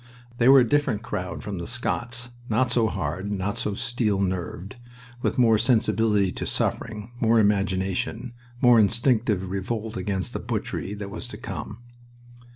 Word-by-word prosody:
They 120 Hz, +2 st, +5 dB
were 135 Hz, -1 st, +9 dB
a 120 Hz, -, +2 dB
different 115 Hz, -5 st, +1 dB
crowd 90 Hz, -5 st, -4 dB
from 100 Hz, -4 st, -4 dB
the 85 Hz, -, -5 dB
Scots, 120 Hz, 0 st, -3 dB, 0.2 s
not 120 Hz, +3 st, +2 dB
so 115 Hz, -2 st, +3 dB
hard, 95 Hz, +3 st, -3 dB
not 100 Hz, 0 st, -2 dB
so 105 Hz, -, -1 dB
steel 115 Hz, -3 st, 0 dB
nerved, 95 Hz, +3 st, -3 dB, 0.4 s
with -, -, -1 dB
more 115 Hz, -4 st, +5 dB
sensibility 110 Hz, -4 st, +2 dB
to -, -, -4 dB
suffering, 110 Hz, 0 st, -2 dB
more 115 Hz, -1 st, +4 dB
imagination, 100 Hz, +4 st, 0 dB, 0.3 s
more 125 Hz, -3 st, +7 dB
instinctive 110 Hz, -3 st, +2 dB
revolt 110 Hz, +3 st, -3 dB
against 95 Hz, -1 st, -2 dB
the -, -, -3 dB
butchery 100 Hz, -, -3 dB
that 100 Hz, -1 st, -7 dB
was 105 Hz, -, -5 dB
to -, -, -7 dB
come. 110 Hz, +3 st, -7 dB
105 Hz, 155 wpm, -25 LUFS, 100-120 Hz, 0.4 s, were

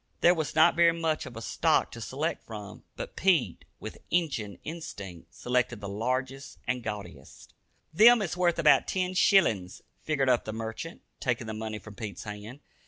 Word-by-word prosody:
There 175 Hz, -, +6 dB
was 160 Hz, -4 st, -3 dB
not 160 Hz, +2 st, +6 dB
very 170 Hz, 0 st, +5 dB
much 160 Hz, -4 st, -1 dB
of 120 Hz, -3 st, -10 dB
a 115 Hz, -, -6 dB
stock -, -, +1 dB
to 115 Hz, -, -9 dB
select 150 Hz, +8 st, -3 dB
from, 105 Hz, -2 st, -9 dB
but -, -, -7 dB
Pete, 165 Hz, -, +1 dB
with -, -, -8 dB
"Injun" 125 Hz, -, -1 dB
instinct, 100 Hz, -, -8 dB
selected 125 Hz, -2 st, 0 dB
the 100 Hz, -, -6 dB
largest 130 Hz, +6 st, -3 dB
and 125 Hz, 0 st, -1 dB
gaudiest. 100 Hz, -, -8 dB, 0.4 s
"Them 235 Hz, +7 st, +8 dB
is 175 Hz, -2 st, -3 dB
wurth 175 Hz, -2 st, +2 dB
about 160 Hz, -2 st, +5 dB
ten 185 Hz, -1 st, -1 dB
shillins," 115 Hz, -, +3 dB, 0.2 s
figured 140 Hz, -4 st, 0 dB
up 125 Hz, -2 st, +3 dB
the 110 Hz, -, -4 dB
merchant, 115 Hz, +9 st, -6 dB, 0.2 s
taking 125 Hz, -3 st, -1 dB
the 110 Hz, -, -5 dB
money 110 Hz, 0 st, -4 dB
from 105 Hz, 0 st, -11 dB
Pete's 105 Hz, 0 st, -7 dB
hand. 105 Hz, +6 st, -8 dB
125 Hz, 170 wpm, -28 LUFS, 110-165 Hz, 0.4 s, Them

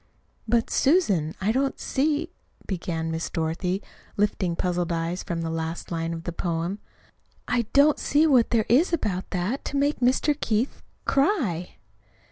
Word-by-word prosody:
"But, 230 Hz, +1 st, +1 dB
Susan, 200 Hz, -, +2 dB
I 200 Hz, +3 st, +1 dB
don't 270 Hz, +3 st, 0 dB
see," 305 Hz, +4 st, 0 dB, 0.3 s
began 165 Hz, -3 st, -3 dB
Miss 160 Hz, +1 st, -3 dB
Dorothy, 180 Hz, +3 st, -2 dB, 0.3 s
lifting 195 Hz, -4 st, +1 dB
puzzled 175 Hz, -1 st, -1 dB
eyes 170 Hz, +2 st, -1 dB
from 170 Hz, -1 st, -3 dB
the 165 Hz, -, -2 dB
last 165 Hz, +1 st, -4 dB
line 165 Hz, 0 st, -2 dB
of 165 Hz, 0 st, -5 dB
the 175 Hz, -, -3 dB
poem, 170 Hz, +3 st, -2 dB, 0.7 s
"I 240 Hz, -3 st, 0 dB
don't 285 Hz, +2 st, +5 dB
see 300 Hz, +2 st, +3 dB
what 260 Hz, -7 st, +4 dB
there 225 Hz, -3 st, +2 dB
is 290 Hz, +10 st, +4 dB
about 205 Hz, -, -1 dB
that 195 Hz, +9 st, -2 dB
to 285 Hz, -, -2 dB
make 285 Hz, +2 st, +1 dB
Mr. 260 Hz, +4 st, +3 dB
Keith 225 Hz, +4 st, 0 dB, 0.2 s
cry." 270 Hz, -, +1 dB
195 Hz, 150 wpm, -25 LUFS, 170-270 Hz, 0.7 s, don't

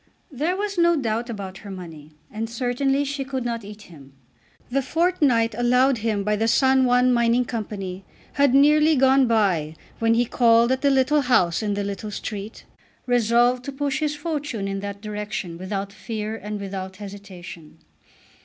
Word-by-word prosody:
There 310 Hz, +7 st, -1 dB
was 405 Hz, -2 st, -2 dB
no 340 Hz, 0 st, +4 dB
doubt 235 Hz, -3 st, -2 dB
about 195 Hz, -4 st, -6 dB
her 205 Hz, -, -11 dB
money, 165 Hz, -5 st, -10 dB, 0.2 s
and 225 Hz, +1 st, -4 dB
certainly 265 Hz, +4 st, 0 dB
she 280 Hz, 0 st, -3 dB
could 260 Hz, -2 st, -4 dB
not 230 Hz, -2 st, -3 dB
eat 210 Hz, +1 st, -11 dB
him. 140 Hz, -7 st, -15 dB, 0.6 s
The 275 Hz, +2 st, +1 dB
fortnight 270 Hz, -7 st, +1 dB
allowed 250 Hz, +2 st, +3 dB
him 215 Hz, -2 st, -1 dB
by 210 Hz, +1 st, 0 dB
the 225 Hz, +2 st, +1 dB
San 265 Hz, +2 st, +4 dB
Juan 250 Hz, 0 st, +3 dB, 0.3 s
Company 195 Hz, -5 st, -5 dB, 0.3 s
had 280 Hz, -2 st, +3 dB
nearly 300 Hz, +2 st, +5 dB
gone 265 Hz, 0 st, +4 dB
by 185 Hz, -9 st, +1 dB, 0.2 s
when 225 Hz, 0 st, +3 dB
he 240 Hz, +1 st, +2 dB
called 235 Hz, 0 st, +4 dB
at 260 Hz, -, 0 dB
the 280 Hz, -, +3 dB
little 275 Hz, +2 st, +3 dB
house 185 Hz, -10 st, +2 dB
in 205 Hz, -2 st, -1 dB
the 205 Hz, -, -2 dB
little 200 Hz, +2 st, -5 dB
street, 210 Hz, 0 st, -6 dB, 0.4 s
resolved 245 Hz, +1 st, +2 dB
to 280 Hz, -, -4 dB
push 280 Hz, 0 st, -2 dB
his 300 Hz, -1 st, -1 dB
fortune 295 Hz, -9 st, -3 dB
in 195 Hz, 0 st, -3 dB
that 200 Hz, 0 st, -6 dB
direction 210 Hz, -5 st, -5 dB
without 195 Hz, +1 st, -4 dB
fear 215 Hz, 0 st, -5 dB
and 210 Hz, -1 st, -6 dB
without 190 Hz, -1 st, -6 dB
hesitation. 185 Hz, -6 st, -10 dB
230 Hz, 165 wpm, -23 LUFS, 200-265 Hz, 0.6 s, nearly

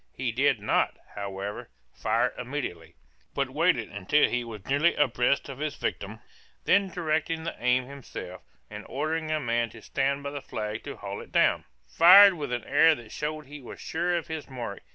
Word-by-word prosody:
He -, -, -2 dB
did -, -, +2 dB
not, -, -, +1 dB, 0.2 s
however, 100 Hz, 0 st, -6 dB, 0.2 s
fire -, -, 0 dB
immediately, 120 Hz, -, -5 dB, 0.4 s
but -, -, -1 dB
waited -, -, +1 dB
until 100 Hz, +10 st, +2 dB
he 125 Hz, 0 st, -1 dB
was 110 Hz, -4 st, -9 dB
nearly 145 Hz, +5 st, +2 dB
abreast 130 Hz, -1 st, +1 dB
of 135 Hz, -1 st, -8 dB
his 150 Hz, -1 st, -3 dB
victim; 110 Hz, +3 st, -4 dB, 0.4 s
then 200 Hz, 0 st, +4 dB
directing 160 Hz, -2 st, -1 dB
the 165 Hz, -, -4 dB
aim 125 Hz, +1 st, +2 dB
himself, 125 Hz, -9 st, -9 dB, 0.3 s
and 105 Hz, +7 st, -8 dB
ordering 155 Hz, +3 st, -2 dB
a 155 Hz, 0 st, 0 dB
man 120 Hz, -3 st, 0 dB
to 110 Hz, -, -13 dB
stand 140 Hz, +1 st, -1 dB
by 140 Hz, -, -4 dB
the 145 Hz, -1 st, -6 dB
flag 105 Hz, -2 st, -5 dB
to -, -, -6 dB
haul 100 Hz, 0 st, -6 dB
it -, -, -13 dB
down, -, -, +3 dB, 0.2 s
fired 195 Hz, +4 st, +8 dB
with 145 Hz, -6 st, -5 dB
an 120 Hz, -1 st, -2 dB
air 160 Hz, +3 st, +5 dB
that 115 Hz, -5 st, -12 dB
showed 155 Hz, 0 st, -4 dB
he 145 Hz, +1 st, -10 dB
was 125 Hz, -, -10 dB
sure 175 Hz, +2 st, -1 dB
of 170 Hz, -, -4 dB
his 160 Hz, -3 st, -6 dB
mark. 120 Hz, -6 st, -6 dB
140 Hz, 185 wpm, -27 LUFS, 115-155 Hz, 0.4 s, fired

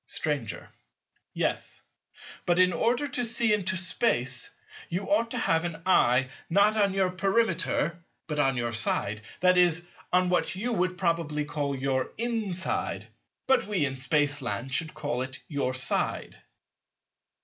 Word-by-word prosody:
Stranger. 125 Hz, -, -2 dB, 0.6 s
Yes: -, -, -2 dB, 0.6 s
but 175 Hz, 0 st, +3 dB
in 180 Hz, 0 st, +5 dB
order 245 Hz, +8 st, +1 dB
to 260 Hz, -2 st, -2 dB
see 230 Hz, -1 st, +1 dB
into 195 Hz, -2 st, 0 dB
Space 130 Hz, -, 0 dB, 0.4 s
you 185 Hz, +4 st, -3 dB
ought 235 Hz, -6 st, +3 dB
to -, -, -3 dB
have 165 Hz, 0 st, +2 dB
an 170 Hz, -2 st, -4 dB
eye, 130 Hz, -8 st, +4 dB, 0.2 s
not 200 Hz, +4 st, +4 dB
on 200 Hz, -3 st, +2 dB
your 190 Hz, -2 st, +2 dB
Perimeter, 185 Hz, -4 st, 0 dB, 0.2 s
but 150 Hz, -2 st, -3 dB
on 135 Hz, -3 st, +2 dB
your 120 Hz, -1 st, -1 dB
side, 110 Hz, -1 st, -1 dB, 0.2 s
that 180 Hz, 0 st, +5 dB
is, 175 Hz, -1 st, +4 dB, 0.3 s
on 180 Hz, 0 st, +3 dB
what 180 Hz, +3 st, +1 dB
you 235 Hz, +6 st, -2 dB
would 185 Hz, -2 st, 0 dB
probably 165 Hz, -4 st, 0 dB
call 145 Hz, -1 st, -2 dB
your 130 Hz, -1 st, -1 dB
inside; 220 Hz, -6 st, -2 dB, 0.4 s
but 265 Hz, -, +3 dB
we 190 Hz, -8 st, +1 dB
in 135 Hz, -1 st, -3 dB
Spaceland 135 Hz, -4 st, 0 dB
should 160 Hz, +2 st, 0 dB
call 145 Hz, -5 st, -2 dB
it 130 Hz, +1 st, -5 dB
your 140 Hz, -4 st, -1 dB
side. 130 Hz, -, -1 dB
170 Hz, 145 wpm, -28 LUFS, 140-195 Hz, 0.6 s, in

